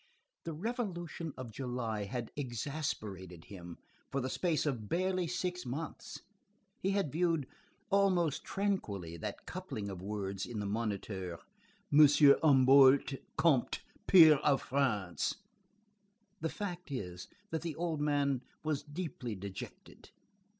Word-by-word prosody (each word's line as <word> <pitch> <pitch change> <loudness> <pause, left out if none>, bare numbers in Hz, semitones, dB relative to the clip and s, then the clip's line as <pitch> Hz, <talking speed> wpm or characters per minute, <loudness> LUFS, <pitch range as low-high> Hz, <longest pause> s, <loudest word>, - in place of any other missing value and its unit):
The 165 - -3
Revolution 175 -5 -4
of 130 -3 -7
July 120 -4 -3
had 120 +2 -4
exasperated 110 - -4
him 90 -4 -9 0.3
for 135 - 0
the 130 0 -2
space 170 -4 0
of 120 -8 -2
barely 185 0 0
six 180 +1 -2
months. 140 +6 -6 0.6
He 190 - 0
had 195 -7 0
viewed, 165 -2 +1 0.5
almost 185 -6 +2
tranquilly, 105 - -2
that - - -6
coupling 100 -1 -5
of 90 -2 -7
words, 100 -1 -3
in 120 -3 -5
the 105 - -3
Moniteur: 100 -4 -3 0.6
M. 145 - +7
Humblot 140 -2 +6 0.2
Conté, 150 -7 +3 0.3
peer 160 -5 +9
of 140 -1 +2
France. 110 -10 0 1.0
The 160 - -1
fact 180 -3 -5
is, 90 -9 -5 0.2
that 160 -1 -1
the 165 -3 -4
old 165 -3 -2
man 140 -3 +1 0.2
was 155 -2 -1
deeply 145 -7 -5
dejected. 100 0 -9
140 Hz, 120 wpm, -33 LUFS, 105-165 Hz, 1.0 s, peer